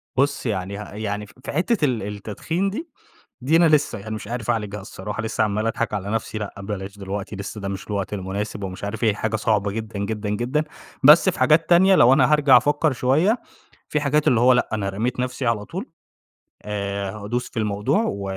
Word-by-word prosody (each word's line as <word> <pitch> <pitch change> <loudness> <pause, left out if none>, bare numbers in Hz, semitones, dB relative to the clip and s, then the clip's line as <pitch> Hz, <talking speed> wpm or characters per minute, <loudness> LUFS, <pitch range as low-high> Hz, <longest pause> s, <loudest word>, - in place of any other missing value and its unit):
بُصّ 140 +1 +1
يعني 100 -3 -2
ه 105 - -6
يعني 105 0 -4
ف 100 - -18
في - - -5
حتة 175 +3 +1
ال 125 -7 -1
التدخين 105 - -3
دي، 310 - -6 0.5
دي 145 +6 +2
أنا 170 -1 +6
لسه 150 -7 +2
يعني 110 +2 -6
مش 110 - -7
عارف 120 -1 -3
أعالجها 105 -3 -2
الصراحة، 105 +3 -6
لسه 110 0 0
عَمّال 105 +1 -1
أضحك 115 -1 -1
على 100 -1 -3
نَفسي، 110 0 -2
لأ 105 -2 -5
بلاش 100 0 -6
دلوقتي 100 +1 -5
لسه 100 +2 -6
ده 100 - -4
مش 95 0 -5
الوقت 100 -1 -3
المناسب 100 +2 -4
ومش 95 0 -6
عارف 110 +3 -3
إيه، 110 -2 +3
حاجة 110 +1 -1
صعبة 105 -2 +1
جدًا، 110 0 -5
جدًا، 105 +1 -3
جدًا، 125 +8 0 0.4
بس 150 +7 +8
في - - -8
حاجات 155 +5 +4
تانية 190 +3 +6
لو 125 -7 +6
أنا 135 +1 +4
هارجع 145 -4 +6
أفكر 145 +3 +2
شوية، 155 - +2 0.5
في 150 - +1
حاجات 150 +1 +1
اللي 120 - +4
هو 125 +2 +6
لأ 125 - +1
أنا 100 -2 -1
رميت 115 +6 -2
نَفسي 125 +1 -2
على 115 -3 0
طول، 185 - -5 0.8
آآ، 100 -1 -3
هادوس 110 +4 -4
في 115 - -4
الموضوع 105 - +1
و 100 0 -4
110 Hz, 205 wpm, -23 LUFS, 100-135 Hz, 0.8 s, بس